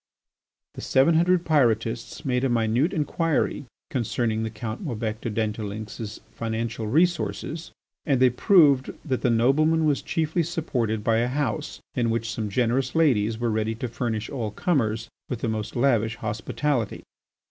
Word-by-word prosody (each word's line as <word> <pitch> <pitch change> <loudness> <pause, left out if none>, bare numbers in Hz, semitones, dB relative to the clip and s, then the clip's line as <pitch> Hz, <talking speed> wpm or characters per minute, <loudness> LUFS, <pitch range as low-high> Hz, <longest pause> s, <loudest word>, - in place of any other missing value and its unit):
The - - -8
seven 135 +5 +3
hundred 175 +2 +3
Pyrotists 120 -3 +1
made 125 -1 +1
a 135 - +2
minute 120 +6 +2
inquiry 150 -2 0 0.2
concerning 115 -3 0
the 110 - -2
Count 110 - -6
Maubec 115 - -3
de - - -3
la 105 - -6
Dentdulynx's 110 0 -4
financial 115 0 -3
resources, 165 +2 0 0.3
and 140 -5 +1
they 130 -1 +5
proved 145 - +4
that 130 -5 -1
that 125 - +2
nobleman 155 +8 +3
was 145 -2 +2
chiefly 160 +1 0
supported 125 -10 -1
by 110 +1 +2
a 120 +1 +2
house 130 -3 -2
in 120 -2 0
which 115 0 -1
some 110 -2 -3
generous 125 +5 0
ladies 115 -9 +3
were 120 0 0
ready 110 +1 -1
to 125 - -4
furnish 115 -2 -3
all 120 -6 -3
comers 115 - 0 0.2
with 125 -3 -4
the - - -1
most 110 -1 -3
lavish 115 -4 +2
hospitality. 110 +4 -2
120 Hz, 155 wpm, -25 LUFS, 110-145 Hz, 0.3 s, they